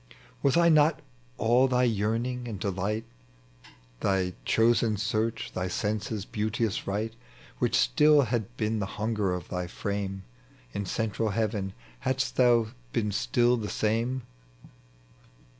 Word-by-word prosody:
Was 140 +3 +3
I 170 0 +5
not 155 -1 +5 0.4
all 125 +4 +4
thy 125 -1 +2
yearning 120 +2 0
and 105 -5 -5
delight, 100 +4 -2 0.9
Thy 95 0 +1
chosen 115 -1 +3
search, 110 +2 -1
thy 90 0 -2
senses' 105 +1 -2
beauteous 110 0 -2
Right, 105 +3 -2 0.5
Which - - +1
still 145 - +5
had 120 0 -2
been 110 0 0
the 100 - -2
hunger 105 -3 0
of 90 -2 -4
thy 90 -1 -3
frame 95 +1 -4 0.5
In 100 -1 -3
central 110 +1 -1
heaven, 105 -2 -1 0.3
hadst 130 - -1
thou 120 -3 +4 0.2
been 105 -3 0
still 120 +3 +2
the 105 -3 -4
same? 115 +4 0
110 Hz, 125 wpm, -28 LUFS, 100-120 Hz, 0.9 s, I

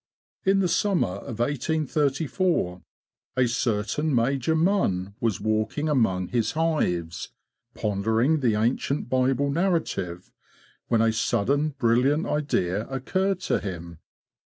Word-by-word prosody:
In 195 +1 +4
the 185 - +2
summer 190 - +1
of 110 - -7
1834 145 - 0 0.6
a 125 -1 +4
certain 120 +5 0
Major 135 +5 +1
Munn 155 - +1
was 110 -5 0
walking 110 +7 -1
among 105 - +1
his 120 -3 0
hives, 90 - -1 0.5
pondering 110 +8 +1
the 120 -6 +2
ancient 120 +5 0
Bible 130 +2 +2
narrative, 160 - -1 0.6
when 115 -2 +3
a 115 -1 +2
sudden 140 +7 0
brilliant 130 +5 +2
idea 110 -9 -1
occurred 185 +8 -1
to - - 0
him. 85 -4 -7
125 Hz, 110 wpm, -25 LUFS, 110-155 Hz, 0.6 s, In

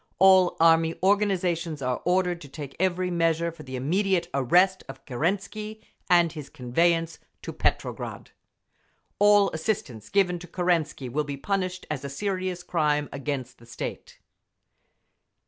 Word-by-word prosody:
All 190 -1 +5
Army 165 0 +4
organisations 180 -5 +1
are 125 -2 -2
ordered 180 -1 +1
to 145 - -11
take 140 -1 -8
every 185 0 0
measure 170 -1 +1
for 165 -1 -13
the 130 -3 -7
immediate 175 +6 0
arrest 180 +8 +3
of 135 0 -10
Kerensky 205 - -3 0.3
and 175 -2 +5
his 150 -4 -8
conveyance 165 +5 0 0.2
to - - -6
Petrograd. - - -2 0.9
"All 205 -1 +5
assistance 155 - -3
given 180 -3 +2
to 175 - -10
Kerensky 170 -6 -1
will 145 +5 -1
be 145 -1 -5
punished 185 +2 -2
as 145 -3 -3
a 140 - -4
serious 185 +2 -3
crime 150 -4 0
against 140 -2 -4
the 115 - -17
state." 120 - -7
170 Hz, 135 wpm, -26 LUFS, 145-185 Hz, 0.9 s, All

